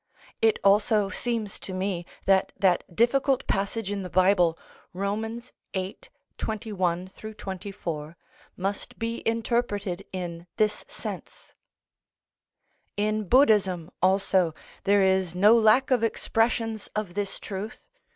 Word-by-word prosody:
It 225 -1 +4
also 205 +1 +4
seems 225 -1 -2
to 190 - -7
me 185 -2 -2 0.2
that 195 -1 +3
that 185 -2 +3
difficult 265 - +2
passage 200 +1 -1
in 200 -1 -2
the 185 - -6
Bible, 180 -2 +4 0.4
Rom. 210 +5 -2 0.4
viii. 190 +1 -2 0.4
21 190 -5 -2 0.3
24, 175 -5 -6 0.4
must 195 +2 -3
be 230 +1 -3
interpreted 225 -5 -1
in 175 -2 -5
this 210 -1 +1
sense. - - -8 1.4
In 215 +1 0
Buddhism 195 - +4
also, 185 -3 +3 0.3
there 200 0 +5
is 190 -2 +2
no 205 +5 +6
lack 235 +5 +4
of 245 -3 +3
expressions 225 -1 0
of 210 -4 -2
this 200 0 -3
truth. 205 +3 -6
200 Hz, 110 wpm, -26 LUFS, 185-220 Hz, 1.4 s, no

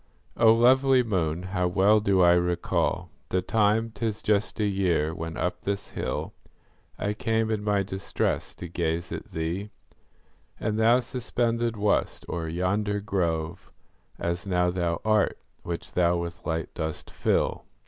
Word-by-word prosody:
O 110 - +6
lovely 130 +3 +5
moon, 90 -6 -1
how 95 -1 -1
well 100 +4 +4
do 100 -3 +2
I 85 0 +7
recall 90 0 0 0.2
The 90 0 0
time,—'tis 110 +1 0
just 105 0 +1
a 105 - +2
year—when 80 -4 0
up 90 - -2
this 100 0 -3
hill - - -3 0.6
I 105 - -1
came, 110 0 0
in 105 -1 -1
my 105 -1 +2
distress, 95 0 -2
to 90 - -7
gaze 85 0 -2
at - - -5
thee: 85 +6 -3 0.9
And 110 0 -1
thou 115 +3 +5
suspended 120 -2 -1
wast 105 0 0
o'er 85 -2 -3
yonder 100 +5 0
grove, 85 -6 -2 0.5
As 85 +3 -3
now 90 -1 +2
thou 85 -2 -1
art, 110 -2 +2 0.2
which 85 -1 -6
thou 85 -1 +3
with 85 -1 -6
light 80 0 -2
dost 80 -2 -4
fill. - - 0
95 Hz, 140 wpm, -27 LUFS, 85-110 Hz, 0.9 s, I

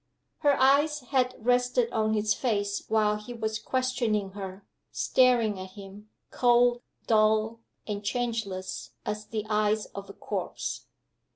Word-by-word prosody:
Her 285 -2 +3
eyes 290 +3 +4
had 255 0 0
rested 245 0 +2
on 220 0 +1
his 210 0 +2
face 205 -5 -1
while 215 -1 +2
he 210 +3 -9
was 220 -1 -2
questioning 240 -5 0
her; 195 0 -8 0.3
staring 235 -6 +3
at 185 0 -8
him, 200 +1 -11 0.2
cold, 245 0 +4 0.2
dull, 220 +1 +3 0.3
and 205 -1 -4
changeless 225 -5 -3
as 210 0 -4
the 215 -1 -3
eyes 215 0 +1
of 200 0 -8
a - - -8
corpse. - - -4
220 Hz, 130 wpm, -28 LUFS, 210-245 Hz, 0.3 s, eyes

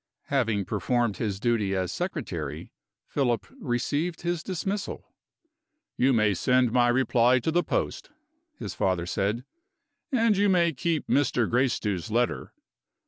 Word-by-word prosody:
Having 115 -7 +1
performed 110 +2 0
his 100 -4 -2
duty 105 -4 +1
as 90 -1 -1
secretary, - - -4 0.3
Philip 125 -5 0
received 150 - -1
his 175 -1 -1
dismissal: 195 +3 -4 0.8
"You 130 +2 +3
may 110 -4 +3
send 125 +5 +2
my 120 0 +4
reply 125 0 +3
to 130 +6 -1
the 175 +2 +3
post," - - -2 0.5
his - - -5
father 90 -2 0
said; 105 +7 -1 0.7
"and 230 -4 +3
you 200 +1 +3
may 170 -3 +3
keep 160 +3 -1
Mr. 125 -5 +2
Gracedieu's 115 -7 0
letter. 110 - 0
125 Hz, 130 wpm, -27 LUFS, 110-160 Hz, 0.8 s, my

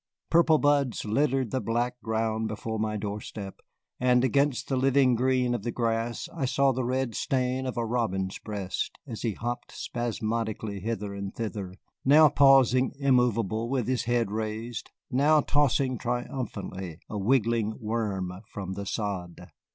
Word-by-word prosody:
Purple 165 -1 +5
buds 145 -5 +2
littered 130 +2 +1
the 130 - 0
black 120 +3 -1
ground 110 0 -1
before 110 +1 -4
my 110 0 -1
door 105 0 -4
step, 100 -2 -8 0.4
and 125 0 +4
against 140 0 +1
the 135 - 0
living 130 0 +4
green 125 0 +2
of 120 - -2
the 120 - -3
grass 115 0 -1
I 140 -5 -1
saw 135 +1 +3
the 130 0 -2
red 130 -1 -1
stain 130 +1 -1
of 130 - -4
a 120 - 0
robin's 105 -5 -1
breast 100 -3 -4
as 115 -6 -7
he 115 -3 0
hopped 120 +4 -4
spasmodically 110 -3 -3
hither 105 -1 -3
and 100 0 -6
thither, 105 -5 -4 0.3
now 150 +3 +7
pausing 135 -3 +5
immovable 120 -5 +2
with 130 -4 0
his 130 -1 0
head 120 -3 +1
raised, 110 +2 -4 0.2
now 145 +4 +4
tossing 135 -3 +1
triumphantly 105 - -4
a 105 - -4
wriggling 115 -1 +2
worm 105 -5 -2 0.2
from 95 -2 -5
the 100 +1 -5
sod. 95 -6 -4
115 Hz, 150 wpm, -28 LUFS, 105-130 Hz, 0.4 s, now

